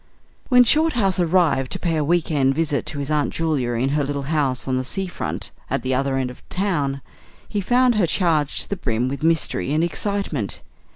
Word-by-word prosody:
When 250 -1 +7
Shorthouse 240 - +2
arrived 165 -7 +2
to - - -4
pay 170 -2 0
a 155 - +1
"week 170 +2 +1
end" 135 -3 +2
visit 155 -2 -1
to 150 - -4
his 140 +1 -3
Aunt 150 -2 +1
Julia 150 -7 -1
in 125 +3 0
her 145 +1 +1
little 140 0 -3
house 135 -5 0
on 130 -1 0
the 130 - -1
sea 190 +9 -2
front 180 - -5 0.2
at - - -1
the 130 - 0
other 135 +1 0
end 130 -1 -1
of - - -13
the - - -9
town, 150 -8 -1 0.4
he 205 - -2
found 245 +5 +3
her 205 -6 +2
charged 160 -5 +1
to - - -9
the 200 - -2
brim 120 -3 -1
with 140 +2 -5
mystery 160 -3 0
and 155 +2 +2
excitement. 170 - -2
155 Hz, 215 wpm, -22 LUFS, 135-185 Hz, 0.4 s, When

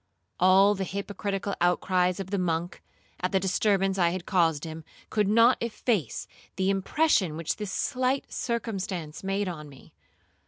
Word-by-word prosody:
All 190 +2 +6
the 195 -1 -3
hypocritical 200 +1 -3
outcries 180 +1 +2
of 190 0 -6
the 200 - 0
monk, 170 0 -2 0.4
at 180 - -1
the 190 - +3
disturbance 195 0 +1
I 170 -1 +4
had 185 +1 -3
again - - -31
caused 165 -6 +2
him, 160 -1 -7 0.3
could 210 -2 +2
not 230 +4 +5
efface 220 - -1 0.3
the 190 +1 +1
impression 195 - +1
which 165 -1 -2
this 210 -3 -5
slight 260 0 -1
circumstance 195 -10 -3
made 195 +1 -1
on 155 -4 -6
me. 135 -2 -16
190 Hz, 155 wpm, -27 LUFS, 175-205 Hz, 0.4 s, All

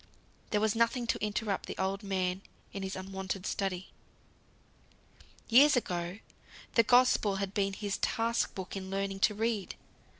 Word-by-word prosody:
There 210 - +1
was 215 0 +2
nothing 230 +2 +2
to 230 - -1
interrupt 210 -1 -1
the - - -6
old 190 +1 -1
man 190 -2 -1 0.3
in 195 - -4
his 190 0 -4
unwonted 190 0 -5
study. 190 -3 -2 1.6
Years 275 +6 +7
ago, 175 -5 -2 0.6
the 230 - +6
Gospel 245 -4 +4
had 195 0 -3
been 195 -1 0
his 205 0 -3
task 230 +1 0
book 190 0 -6
in 190 -1 -5
learning 195 0 -2
to 210 +2 +3
read. 220 -2 -1
195 Hz, 145 wpm, -31 LUFS, 190-225 Hz, 1.6 s, Years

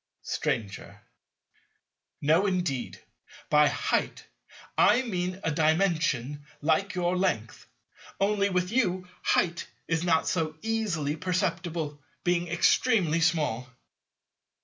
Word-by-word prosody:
Stranger. 100 -4 -3 1.2
No, 160 +7 +3
indeed. 175 -9 -2 0.5
By 150 0 +6
"height" - - -1 0.5
I 240 +5 +5
mean 185 -5 -3
a 165 - 0
Dimension 155 -4 +1 0.2
like 165 +7 +1
your 180 0 0
length: 150 - -2 0.5
only, 200 0 +2
with 180 -1 0
you, 185 -7 0
"height" 170 -2 +1 0.2
is 165 0 0
not 165 -2 +2
so 160 -3 -1
easily 200 -10 -1
perceptible, 170 -4 -2 0.2
being 175 0 +1
extremely 175 0 +2
small. 150 -8 +1
170 Hz, 100 wpm, -28 LUFS, 155-185 Hz, 1.2 s, By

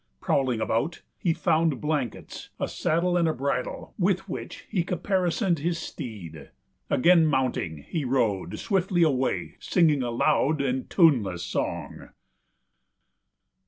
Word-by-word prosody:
Prowling 130 - +1
about, 115 +9 -1 0.2
he 175 - +1
found 160 -4 +1
blankets, 150 -6 -3
a - - -1
saddle 175 +3 0
and 165 -4 +1
bridle 135 -1 -3
with 190 0 +1
which - - -7
he 190 -6 0
caparisoned 180 0 0
his 170 +3 -1
steed. 90 - -8 0.4
Again 165 +3 +5
mounting, 125 - -1
he 160 - -2
rode 120 -7 0
swiftly 190 -3 +1
away, 135 -5 0
singing 155 -6 +2
a 120 - -1
loud 135 +5 +2
and 130 -2 -1
tuneless 110 - +3
song. 95 - -4
150 Hz, 120 wpm, -26 LUFS, 125-170 Hz, 0.4 s, Again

